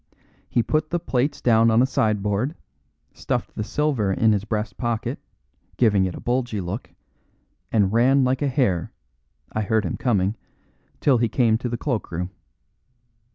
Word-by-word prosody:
He 120 - +2
put 155 +6 0
the 175 - 0
plates 135 -2 -1
down 115 -1 +4
on 110 +1 +4
a 125 - +5
sideboard, 110 - 0 0.6
stuffed - - -3
the 105 - -3
silver 130 -5 0
in 110 +3 +3
his 105 -1 0
breast 105 -3 -3
pocket, 120 -2 -2 0.6
giving 105 -5 +4
it 90 - -3
a - - -7
bulgy 120 -3 -1
look, 95 +5 -5 0.8
and 105 -3 +2
ran 130 +4 +4
like 130 +1 +1
a 145 - +2
hare 125 - 0 0.6
(I 110 - 0
heard 110 0 +1
him 85 - -3
coming) 105 -4 +1 0.6
till 130 -5 +4
he 120 -1 +1
came 115 -1 +3
to 125 - -3
the 120 - -2
cloak 120 -2 -2
room. 90 +2 -3
115 Hz, 160 wpm, -23 LUFS, 105-125 Hz, 0.8 s, a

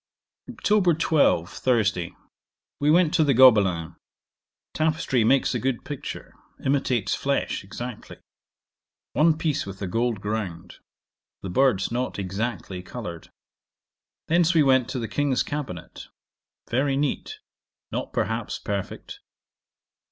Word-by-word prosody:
'Oct. 185 -6 +2
12. 145 - +3
Thursday. 100 -8 0 0.6
We 145 - +2
went 165 0 +4
to 165 - +4
the 140 -4 +2
Gobelins. 100 -10 +5 0.8
Tapestry 155 -6 +1
makes 135 +5 +3
a - - -1
good 130 -2 -2
picture; 145 -3 -7 0.3
imitates 130 -7 +1
flesh 140 0 -1
exactly. 120 +4 -8 1.0
One 155 0 +4
piece 155 -7 -1
with 100 0 -8
a 100 - -3
gold 115 +3 -1
ground; 95 -5 -5 0.6
the 95 - -4
birds 125 -3 +2
not 125 +2 -2
exactly 100 -1 -4
coloured. 90 -4 -8 1.0
Thence 170 +1 +3
we 155 - +6
went 130 -3 +3
to - - -3
the 115 -2 -3
King's 135 +4 0
cabinet; 140 - -6 0.6
very 135 +2 +1
neat, 150 - -2 0.5
not, - - -3
perhaps, - - -2
perfect. 410 - -5
125 Hz, 115 wpm, -25 LUFS, 100-145 Hz, 1.0 s, we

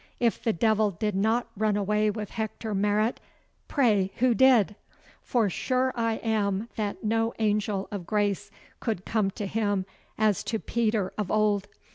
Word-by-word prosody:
If 235 -2 +1
the 225 - +2
Devil 215 +2 +2
did 210 +3 -2
not 220 +5 +1
run 210 0 +1
away 210 +1 +1
with 210 -1 -4
Hector 220 0 -4
Marot, 210 +3 +1 0.5
pray 210 -9 +2
who 250 0 +3
did? 230 -4 +5 0.5
for 235 -4 +1
sure 255 +7 0
I 230 -1 +1
am 215 -1 0
that 210 -2 -3
no 225 +1 0
angel 210 -2 0
of 190 -5 -5
grace 205 -1 0 0.3
could 215 -6 -3
come 215 -3 +1
to 210 - -2
him 205 -2 0 0.3
as 215 -3 +2
to 225 - -1
Peter 215 -4 -1
of 205 -3 -1
old. 210 -2 +2
215 Hz, 155 wpm, -27 LUFS, 205-225 Hz, 0.5 s, did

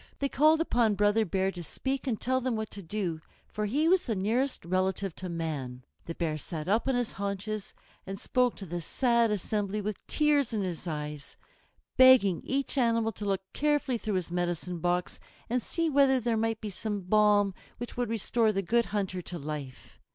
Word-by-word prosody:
They 275 - -1
called 310 +3 +4
upon 235 -9 +2
Brother 210 +2 +3
Bear 190 +1 0
to 175 - -8
speak 265 - -3
and 230 -5 -1
tell 260 +1 0
them 255 -2 -1
what 220 -1 -4
to 200 - -7
do; 175 -3 -3 0.2
for 210 0 -3
he 295 +9 +1
was 370 -2 +3
the 225 - 0
nearest 230 +5 0
relative 185 +1 0
to 185 - -5
man. 145 -7 -4 0.2
The 165 - -5
Bear 155 -3 -2
sat 155 0 -5
up 215 +6 +2
on 265 - +2
his 245 -2 0
haunches 200 +1 -4 0.3
and 195 0 -5
spoke 250 +1 +1
to 195 - -8
the 175 0 -4
sad 235 +5 +2
assembly 210 0 -1
with 210 -1 -5
tears 290 -5 +2
in 210 -2 0
his 180 -1 -4
eyes, 150 -2 -5 0.6
begging 255 -9 +7
each 275 +1 -1
animal 230 -2 +2
to 210 0 -7
look 195 -2 0
carefully 290 -4 +1
through 215 -2 -2
his 180 -2 -2
medicine 175 0 -2
box 175 +1 -1 0.3
and 250 0 +1
see 330 +8 -1
whether 275 -3 +4
there 235 -1 0
might 225 0 0
not - - -51
be 210 - -4
some 205 +1 -3
balm 205 +1 +3 0.2
which 240 - -7
would 245 -2 -1
restore 225 0 +1
the 195 -1 -1
Good 235 +6 +2
Hunter 190 -2 -2
to 175 0 -7
life. 145 -4 -7
210 Hz, 195 wpm, -29 LUFS, 180-240 Hz, 0.6 s, begging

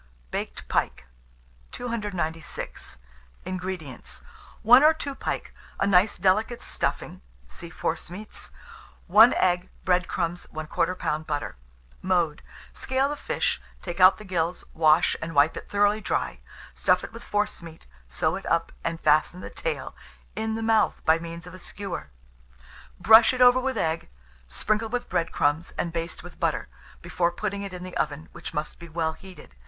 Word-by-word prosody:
BAKED - - -5
PIKE. 65 - -1 0.7
296. 200 - -4 0.5
INGREDIENTS. 185 -6 -5 0.4
1 245 +5 +8
or 315 +1 +6
2 285 -3 -4
pike, - - -4 0.3
a - - +2
nice 195 +1 +4
delicate 215 +6 +1
stuffing - - -3 0.3
(see 165 - -10
Forcemeats), 175 +6 -5 0.6
1 215 +6 +7
egg, 180 0 +1 0.2
bread 180 -1 +2
crumbs, 175 0 -2
1/4 155 +3 -1
lb. 155 -2 -2
butter. 145 - -3 0.5
Mode. 175 -5 +1 0.3
Scale 265 +1 0
the 295 - -2
fish, - - -1 0.2
take 175 0 -5
out 185 +1 +8
the 215 - -10
gills, 175 -2 -1
wash, 160 +1 +4
and 165 -1 -5
wipe 145 +3 +5
it - - -8
thoroughly 205 +1 +2
dry; - - -2 0.3
stuff - - +2
it - - -8
with 230 - -9
forcemeat, 170 -6 -3 0.2
sew 65 - 0
it - - -7
up, - - +1
and 165 0 -2
fasten 155 +4 +3
the - - -8
tail - - -4 0.4
in 220 0 -2
the 225 - -3
mouth 220 -1 +3
by 160 +1 +5
means 170 +1 -8
of 180 - -11
a 185 - -10
skewer; 185 - -6 0.9
brush 225 +3 +7
it - - -5
over 250 0 +7
with 260 -1 -2
egg, 165 -3 -1 0.4
sprinkle 215 - 0
with 245 +1 -2
bread 170 -2 0
crumbs, 145 +4 +1
and 170 - -2
baste 165 0 -4
with - - -12
butter, - - -1 0.3
before 170 -1 0
putting 200 +2 -3
it 200 -1 -5
in 180 -1 -7
the 185 0 -8
oven, 155 +2 -2
which 170 - -8
must 150 -1 -4
be 170 0 -10
well 160 0 -1
heated. 180 - -14
180 Hz, 160 wpm, -26 LUFS, 165-215 Hz, 0.9 s, 1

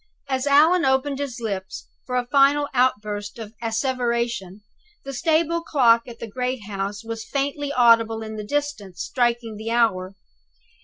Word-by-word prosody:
As 265 0 -1
Allan 315 +5 +5
opened 265 +1 +1
his 265 -4 -4
lips 195 -4 -5 0.2
for 250 - -3
a 250 -1 +1
final 280 +2 +4
outburst 210 -5 0
of 220 -2 -8
asseveration, 235 -4 -1 0.4
the 275 - -5
stable 330 +4 +1
clock 240 -8 +3
at 235 -1 -9
the - - -6
great 250 +1 -3
house 200 +1 -4
was 225 0 -5
faintly 285 +1 -2
audible 230 -3 +4
in 220 0 -7
the 210 - -5
distance 285 -7 -3
striking 240 -3 -1
the 220 +1 -5
hour. 200 -5 +1
240 Hz, 150 wpm, -23 LUFS, 220-275 Hz, 0.4 s, Allan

